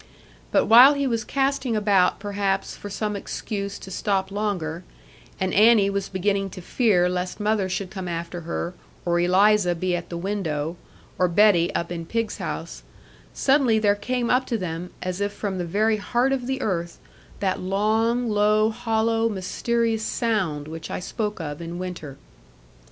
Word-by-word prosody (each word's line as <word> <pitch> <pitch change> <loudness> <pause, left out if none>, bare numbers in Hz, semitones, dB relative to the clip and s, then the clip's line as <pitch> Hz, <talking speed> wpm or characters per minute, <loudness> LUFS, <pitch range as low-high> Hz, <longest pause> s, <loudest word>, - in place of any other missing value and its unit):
But - - +3
while 250 +6 +8
he 280 0 0
was 230 -3 0
casting 270 -3 0
about 200 -4 +3
perhaps 200 -1 -2
for 205 - -8
some 210 +1 -2
excuse 200 0 -4
to 190 - -10
stop 190 0 -1
longer, 185 -5 -2 0.6
and 190 -1 -1
Annie 210 -1 +5
was 195 -1 -2
beginning 195 +1 0
to - - -5
fear 180 -2 +2
lest 180 +2 -3
mother 210 -2 +1
should 185 0 -3
come 190 -3 -5
after 170 0 -4
her, 170 +1 -4 0.3
or 175 0 +2
Eliza 185 +1 +4
be 180 +1 -1
at 175 - -5
the 170 - -4
window, 170 -5 -2 0.4
or 180 - +4
Betty 175 -1 +4
up 170 0 -2
in 165 -1 -5
pigs' 230 +1 -2
house, - - -5 0.5
suddenly 265 -5 +3
there 210 -2 +3
came 245 +3 -2
up 255 +1 +2
to 230 - 0
them, 180 -2 -5
as 185 +1 -3
if 205 0 0
from 195 -3 -3
the 175 - -2
very 215 +5 +1
heart 240 +5 0
of 255 -2 -1
the 265 0 -2
earth, 170 -4 -2 0.4
that 195 -2 0
long, 220 +5 +1
low, 215 +1 +3
hollow, 225 0 0
mysterious 225 +3 -1
sound 190 -11 -1
which 160 0 -7
I - - -3
spoke 210 +2 -3
of 150 -1 -5
in 170 +1 -6
winter. 175 -7 -6
200 Hz, 170 wpm, -24 LUFS, 180-220 Hz, 0.6 s, while